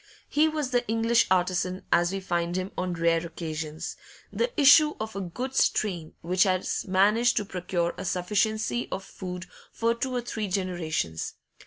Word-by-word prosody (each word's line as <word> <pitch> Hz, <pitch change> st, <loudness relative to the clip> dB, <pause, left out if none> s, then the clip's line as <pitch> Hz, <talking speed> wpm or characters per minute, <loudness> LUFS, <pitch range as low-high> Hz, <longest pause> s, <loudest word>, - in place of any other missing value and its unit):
He 305 Hz, +2 st, +3 dB
was 305 Hz, -4 st, -2 dB
the 245 Hz, -1 st, +2 dB
English 230 Hz, +1 st, +3 dB
artisan 185 Hz, 0 st, +1 dB
as 175 Hz, +1 st, +3 dB
we 195 Hz, -, -2 dB
find 175 Hz, -2 st, -1 dB
him 185 Hz, +1 st, -2 dB
on 180 Hz, -1 st, -2 dB
rare 165 Hz, 0 st, +2 dB
occasions, 155 Hz, -2 st, -5 dB, 0.4 s
the 480 Hz, -, 0 dB
issue 300 Hz, +2 st, +7 dB
of 220 Hz, -1 st, -5 dB
a 200 Hz, -, -2 dB
good 250 Hz, +9 st, -5 dB
strain 175 Hz, -11 st, 0 dB
which 180 Hz, +2 st, 0 dB
has 185 Hz, -2 st, +1 dB
managed 210 Hz, +6 st, +3 dB
to 210 Hz, -, +1 dB
procure 175 Hz, -2 st, -2 dB
a -, -, -5 dB
sufficiency 215 Hz, +6 st, 0 dB
of 190 Hz, -, -3 dB
food 180 Hz, -2 st, -7 dB, 0.3 s
for 230 Hz, 0 st, +1 dB
two 255 Hz, +2 st, -3 dB
or 245 Hz, -, 0 dB
three 220 Hz, -3 st, -4 dB
generations. 175 Hz, -, -2 dB
190 Hz, 165 wpm, -27 LUFS, 175-230 Hz, 0.4 s, issue